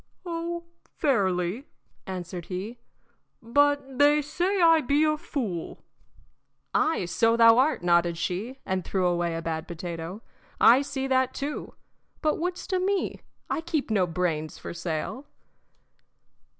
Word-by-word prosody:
"Oh, 340 0 -3 0.3
fairly," 200 - 0 0.4
answered 180 -2 -5
he. 200 +6 -5 0.6
"But 280 +2 +1
they 295 +1 +5
say 355 +7 0
I 330 -2 +6
be 290 +3 +2
a 305 0 +3
fool." 230 - -4 0.9
"Ay, 315 - +2
so 230 +6 +2
thou 230 0 +7
art," 270 - +2
nodded 170 -1 +3
she, 195 +10 -3
and 190 -1 -1
threw 185 0 -1
away 175 -1 0
a 165 - -4
bad 160 0 -3
potato. 170 +3 -6 0.4
"I 245 +4 +7
see 275 -1 -3
that 260 -1 +1
too. 290 +2 -5 0.5
But 305 0 +1
wouldst 355 +2 -3
o' 370 - +2
me? 390 +1 -1 0.3
I - - -1
keep 320 -7 -2
no 190 -4 +2
brains 165 -3 -2
for - - -7
sale." 170 - -4
235 Hz, 135 wpm, -27 LUFS, 175-295 Hz, 0.9 s, thou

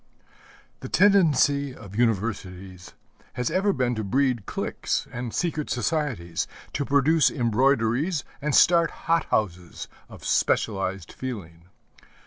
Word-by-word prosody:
The - - -8
tendency 145 -8 +3
of 100 -3 -12
universities 95 -5 -2 0.4
has 125 -1 -2
ever 200 +2 +2
been 125 -8 0
to 110 -2 -3
breed 125 +1 0
cliques - - -2
and 120 -1 -5
secret 160 -1 -2
societies, 120 - -2 0.3
to - - -1
produce 145 +3 +3
embroideries 130 - +1 0.2
and 150 0 0
start 170 -1 +5 0.2
hothouses 100 - -1 0.2
of - - -12
specialized 95 -4 0
feeling. 90 -10 -7
125 Hz, 110 wpm, -25 LUFS, 100-150 Hz, 0.4 s, start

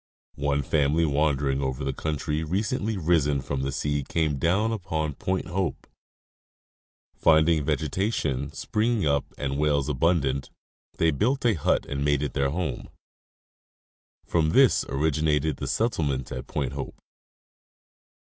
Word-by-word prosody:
One 70 0 +1
family 75 +4 +2
wandering 70 -2 +1
over 65 0 -2
the 70 0 -1
country 75 +1 -2
recently 105 +5 -1
risen 75 -5 +2
from 65 0 -3
the 70 +1 -2
sea 75 +1 -1
came 75 -1 -1
down 100 +8 +2
upon 80 -8 -2
Point 95 +6 -2
Hope: 90 0 -2 1.3
finding 80 -1 +4
vegetation 75 - -1
springing 110 -2 0
up 70 -1 +1
and 70 -1 -2
whales 75 -2 +1
abundant, 70 -2 +1 0.5
they 80 -1 +3
built 125 - 0
a 115 - +5
hut 80 - +1
and 70 0 -3
made 70 0 +2
it 75 - -3
their 70 -1 +1
home. 80 -4 -3 1.4
From 80 -2 +1
this 135 -2 +5
originated 75 0 +1
the - - -4
settlement 75 - -1
at - - -6
Point 70 -3 -2
Hope. 70 - -5
75 Hz, 130 wpm, -26 LUFS, 70-85 Hz, 1.4 s, a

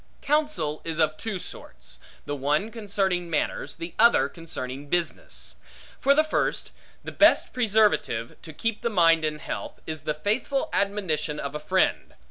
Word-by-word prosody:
Counsel 295 - 0
is 165 -1 -3
of 155 -1 +3
two 220 +2 -4
sorts: 60 - -7 0.3
the 145 - -2
one 150 +10 0
concerning 195 -5 -1
manners, 155 - -1
the 170 0 -7
other 235 +1 +6
concerning 145 -6 -6
business. 175 +1 -3 0.4
For 280 +1 +4
the 310 - +5
first, 310 - -1 0.3
the - - -6
best - - +5
preservative 210 - +2
to 160 - -9
keep 225 +8 -2
the 235 - 0
mind 165 -5 +5
in 155 -1 -1
health, - - -6
is 155 -2 -5
the 150 +1 -2
faithful 225 - -1
admonition 165 -7 0
of 140 0 -4
a 150 - -3
friend. 185 +5 +1
170 Hz, 155 wpm, -26 LUFS, 150-215 Hz, 0.4 s, other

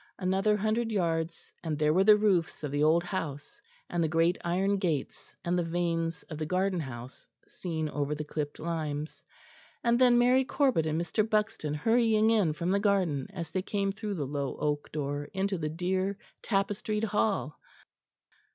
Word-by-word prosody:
Another 195 +3 +2
hundred 220 +2 0
yards, 165 -4 -1
and 160 -3 -2
there 150 0 +3
were 185 +3 +4
the 210 +1 +7
roofs 190 -7 +1
of 145 - -3
the 145 +1 0
old 165 +3 +4
house, 160 -6 -5 0.3
and 175 -1 0
the - - +2
great 165 +3 +2
iron 190 +4 +1
gates, 165 -7 -2
and 175 +1 +1
the - - +1
vanes 165 -1 -1
of 155 -2 -8
the 155 - -1
garden 185 +1 +1
house 130 -3 -8 0.2
seen 160 -3 -3
over 145 0 -2
the 150 - -4
clipped 150 -1 -4
limes; 155 -2 -4 0.6
and 235 0 +3
then 250 -2 +6
Mary 250 +2 +5
Corbet 260 - +1
and 155 +1 0
Mr. 175 +6 0
Buxton 210 -9 0
hurrying 225 +4 +3
in 200 -9 +3
from 170 +3 -2
the 200 - +3
garden, 190 -9 +1
as 170 -5 -6
they 185 - 0
came 195 0 -1
through 205 0 -4
the 150 -5 -2
low 140 0 -3
oak 145 -1 -2
door, 145 -1 -3
into 190 -1 -1
the 155 -1 -2
dear 185 +4 -1 0.2
tapestried 205 +1 -1
hall. 210 -7 0
175 Hz, 175 wpm, -29 LUFS, 155-205 Hz, 0.6 s, the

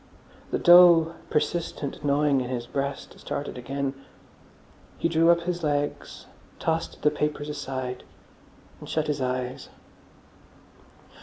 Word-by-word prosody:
The - - 0
dull, 175 -2 +7 0.2
persistent 150 -2 -2
gnawing 145 -1 +2
in 125 - -4
his 120 -2 -3
breast 140 +1 -4
started 145 - -5
again. 135 +2 -3 1.0
He - - +1
drew 165 0 +3
up 170 0 +5
his 175 0 -3
legs, 145 -1 -2 0.3
tossed 165 0 -2
the 150 - +4
papers 150 0 -2
aside, 130 -3 -5 0.8
and - - -11
shut 155 -1 0
his 150 -2 -2
eyes. 125 0 -3
145 Hz, 120 wpm, -26 LUFS, 135-165 Hz, 1.0 s, dull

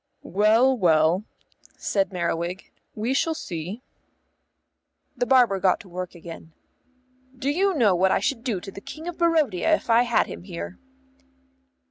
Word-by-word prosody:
"Well, 220 +7 +3
well," 170 -1 +3 0.5
said 195 -1 0
Merriwig, 175 +1 -3 0.2
"we 225 +5 -1
shall 320 +4 +1
see." 180 - -6 1.3
The 245 - -1
barber 240 -6 +4
got 185 0 +2
to 200 - -16
work 180 0 -6
again. 165 -1 -11 0.8
"Do 270 +3 -1
you 380 +4 +1
know 225 -9 +4
what 185 +2 +3
I - - +3
should 235 -4 -2
do 220 -7 -1
to 195 - -8
the 195 - -10
King 315 +9 -9
of 350 - -6
Barodia 320 - +2
if 235 - -4
I 230 +1 +6
had 240 -2 +2
him - - -8
here?" 175 0 -7
205 Hz, 150 wpm, -24 LUFS, 180-260 Hz, 1.3 s, I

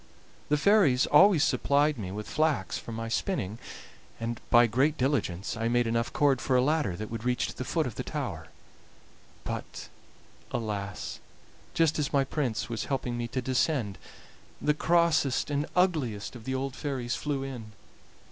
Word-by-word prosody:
The 150 - +3
fairies 155 -7 +4
always 180 +1 +6
supplied 145 -1 +2
me 95 -3 -5
with 105 +2 -6
flax 150 -11 0
for - - -9
my 115 0 -4
spinning, 115 - -2 0.6
and 115 0 -4
by 120 0 +7
great 135 +7 +1
diligence 110 -9 -1
I 115 0 -1
made 120 +1 +2
enough 115 +1 0
cord 140 -5 +2
for 130 - +1
a 125 - +5
ladder 150 - +1
that 110 +4 -6
would 115 -1 -5
reach 125 0 +1
to - - -8
the - - -4
foot - - 0
of - - -4
the - - -4
tower; - - -4 1.0
but, - - -6 0.6
alas! 100 -4 -4 0.6
just 160 -1 +2
as 150 +1 -1
my 140 -2 +3
prince 130 -5 -2
was 115 -2 -3
helping 130 -3 -2
me 120 0 -3
to 130 +1 -3
descend 130 -5 0
it, - - -26 0.6
the 150 - +4
crossest 155 -4 +2
and 145 +2 0
ugliest 145 - 0
of 115 -2 -11
the 130 - -2
old 135 0 -3
fairies 130 -5 -3
flew 145 -2 -2
in. 120 -6 -7
130 Hz, 170 wpm, -28 LUFS, 115-150 Hz, 1.0 s, by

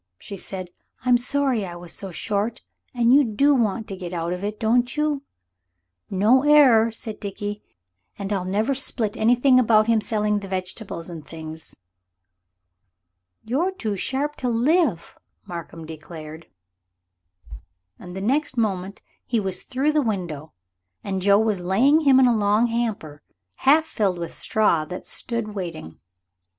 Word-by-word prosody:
she 200 - -9
said. 185 -1 -7 0.3
"I'm 245 -1 +4
sorry 260 -2 +1
I 175 -2 -6
was 175 -1 -8
so 195 - -4
short. 205 +5 -2 0.3
An' 240 -1 +2
you 285 +2 +7
do 275 +5 +3
want 225 -3 0
to 195 - -4
get 180 -1 -6
out 170 +1 -2
of 180 +2 -6
it, 210 +1 -4
don't 245 +4 +1
you?" 300 -2 0 0.9
"No 215 +7 +4
error," 270 -6 +6
said 225 -1 -6
Dickie; 205 +1 -5 0.6
"an' 200 +1 -3
I'll 190 -2 -1
never 210 +8 0
split 240 -5 -1
about 240 -1 +4
him 225 -1 +2
selling 210 -1 0
the 200 - -8
vegetables 185 -1 -4
and 165 -3 -8
things." 160 0 -8 1.7
"You're 290 +12 0
too 220 - -3
sharp 280 +9 -2
to 250 - -2
live," 240 - +1 0.3
Markham 170 -1 -8
declared; 160 0 -10 1.5
and 180 0 -10
next 280 +2 0
moment 200 -3 -2 0.2
he 235 - 0
was 190 -3 -3
through 270 +3 0
the 300 0 +2
window, 175 - -3 0.5
and 190 -2 -3
Joe 200 +1 +5
was 215 -2 +1
laying 225 - +3
him 275 -4 +5
in 265 - +6
a 240 -2 +4
long 210 +2 +3
hamper 225 -11 -3 0.4
half 305 +4 +4
filled 200 - -1
with 170 -1 -5
straw 205 -8 +1
that 180 +4 -7
stood 230 -3 -4
waiting. 170 - -6
215 Hz, 145 wpm, -23 LUFS, 185-250 Hz, 1.7 s, you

